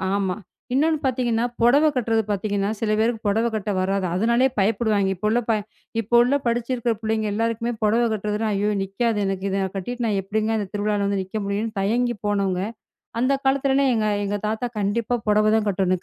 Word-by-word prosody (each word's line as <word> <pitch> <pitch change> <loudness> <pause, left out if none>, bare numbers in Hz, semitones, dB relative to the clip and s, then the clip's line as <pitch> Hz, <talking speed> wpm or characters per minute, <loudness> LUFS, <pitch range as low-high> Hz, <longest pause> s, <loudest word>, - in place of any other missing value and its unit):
ஆமா. 190 -2 0 0.4
இன்னொன்று 310 +4 +3
பார்த்தீங்கன்னா, 240 -3 +1 0.2
புடவை 285 +6 +5
கட்டுகிறது 225 -3 +1
பார்த்தீங்கன்னா, 205 0 -1
சில 220 -2 0
பேருக்குப் 225 0 0
புடவை 225 +3 +2
கட்ட 210 -1 -2
வராது. 190 +1 0
அதனாலயே 235 +6 +3
பயப்படுவார்கள். 205 -1 +2
இப்போ 190 +4 -2
உள்ள 230 +3 +2
ப - - +4 0.5
இப்ப 230 +2 -10
உள்ள 250 +4 +3
படிச்சிருக்கற 240 0 0
பிள்ளைகள் 220 -1 -1
எல்லாருக்குமே 230 +2 -1
புடவை 225 +3 +3
கட்டுகிறது 210 0 -2
என்றால், 215 -2 0
ஐயோ 205 +1 +1
நிற்காதே 210 +3 -1
எனக்கு, 195 0 -2
இதை 195 - -1
நான் 190 0 -4
கட்டிவிட்டு 240 +5 -3
நான் 205 -2 +1
எப்டிங்க 215 +3 -1
இந்த 205 - -3
திருவிழாவில் 205 0 0
வந்து 200 0 0
நிற்க 190 +3 -4
முடியும்னு 210 +3 -2
தயங்கி 240 +5 +1
போனவர்கள், 200 -1 0 0.5
அந்தக் 270 +2 +1
காலத்துல 270 0 +2
எல்லாம் 275 -2 +3
எங்க 220 -2 +1 0.2
எங்க 205 +1 -1
தாத்தா 220 +3 -2
கண்டிப்பா 215 +4 0
புடவைதான் 215 +1 +3
கட்டணும் 185 -2 0
215 Hz, 180 wpm, -23 LUFS, 200-235 Hz, 0.5 s, புடவை